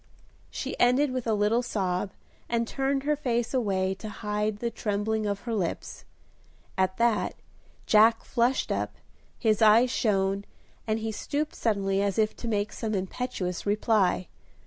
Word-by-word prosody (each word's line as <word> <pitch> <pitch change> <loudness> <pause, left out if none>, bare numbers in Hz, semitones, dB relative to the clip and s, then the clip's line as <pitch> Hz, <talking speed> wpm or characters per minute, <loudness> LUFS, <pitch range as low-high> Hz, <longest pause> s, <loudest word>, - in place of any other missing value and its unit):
She - - -4
ended 255 +3 +4
with 255 -2 -3
a 220 - +2
little 210 +3 +2
sob, 190 -5 -1 0.4
and 235 -1 0
turned 270 +1 -1
her 300 +1 +2
face 240 -5 -1
away 190 -6 +1
to 215 - -6
hide 210 0 -2
the 235 +2 -2
trembling 215 0 -1
of 200 -1 -2
her 235 - -4
lips. 190 -6 -3 0.7
At 190 0 +1
that, 235 -2 +1 0.5
Jack 225 +1 +5
flushed 245 +1 +1
up, - - -2 0.4
his 220 -2 +1
eyes 225 +3 +6
shone, 195 -4 +1 0.4
and 215 0 +1
he 225 0 -3
stooped 295 +7 -3
suddenly 195 -3 0
as 200 -2 0
if 215 -1 +2
to 235 - -6
make 210 -2 -1
some 220 -2 -2
impetuous 190 -2 -3
reply. 205 -4 +2
215 Hz, 150 wpm, -27 LUFS, 200-235 Hz, 0.7 s, eyes